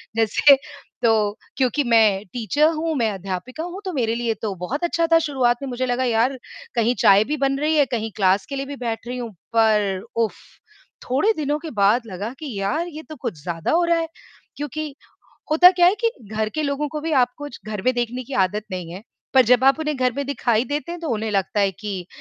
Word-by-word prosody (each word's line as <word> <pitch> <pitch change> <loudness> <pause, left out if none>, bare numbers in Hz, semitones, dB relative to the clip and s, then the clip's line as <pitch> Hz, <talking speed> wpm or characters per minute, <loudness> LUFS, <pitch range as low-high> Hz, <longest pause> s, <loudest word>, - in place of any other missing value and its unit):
जैसे 225 +6 +5 0.5
तो 215 -3 +2 0.2
क्योंकि 265 +2 +1
मैं 220 -5 +3
टीचर 250 +6 +2
हूँ, 325 0 -2
मैं 230 -5 +1
अध्यापिका 195 - -5
हूँ 355 +3 -6
तो 370 - -3
मेरे 230 -5 0
लिए 235 -1 -1
तो 210 -3 -2
बहुत 205 - -4
अच्छा 335 -1 +1
था 330 - +7
शुरुआत 265 -6 +1
में, 275 - -4
मुझे 255 +1 -2
लगा, 250 +1 0
यार 240 +2 +1 0.4
कहीं 235 +1 +2
चाय 200 +1 +6
भी 305 - 0
बन 275 -1 +1
रही 305 +2 +1
है 290 - +5
कहीं 225 -1 -3
क्लास 195 -1 +2
के 280 - -6
लिए 275 0 -3
भी 285 +1 -6
बैठ 235 -3 -4
रही 250 +1 -4
हूँ। 240 -2 -5 0.2
पर 210 -4 +2
उफ्फ़! 230 -2 -3 0.4
थोड़े 275 - +2
दिनों 295 -4 -1
के 320 +1 -7
बाद 205 +5 +4
लगा 200 +1 -5
कि 310 - -6
यार 210 - -1
ये 310 -2 -8
तो 310 - -7
कुछ 215 - -5
ज़्यादा 165 0 -3
हो 345 +2 +3
रहा 340 0 +2
है, 330 0 -1 0.5
क्योंकि 295 0 -5 0.6
होता 355 +4 +8
क्या 355 -1 +4
है 365 - +5
कि 460 - +3 0.2
घर 215 0 0
के 310 - -1
लोगों 285 0 -1
को 305 +1 -5
भी 320 +1 -3
आपको 250 +4 -4 0.2
घर 210 -3 -4
में 255 - +5
देखने 245 +1 -2
की 275 - -11
आदत 210 +3 -4
नहीं 180 -3 -5
है, 185 +3 -8 0.3
पर 260 - +8
जब 250 +1 +5
आप 270 +3 +5
उन्हें 305 -2 -1
घर 255 -1 +1
में 280 - -1
दिखाई 240 -4 +1
देते 295 +6 -3
हैं, 350 - -7
तो 330 - -4
उन्हें 220 -1 -1
लगता 200 0 0
है 200 -1 +3
कि 195 -3 -6
245 Hz, 225 wpm, -22 LUFS, 215-295 Hz, 0.6 s, होता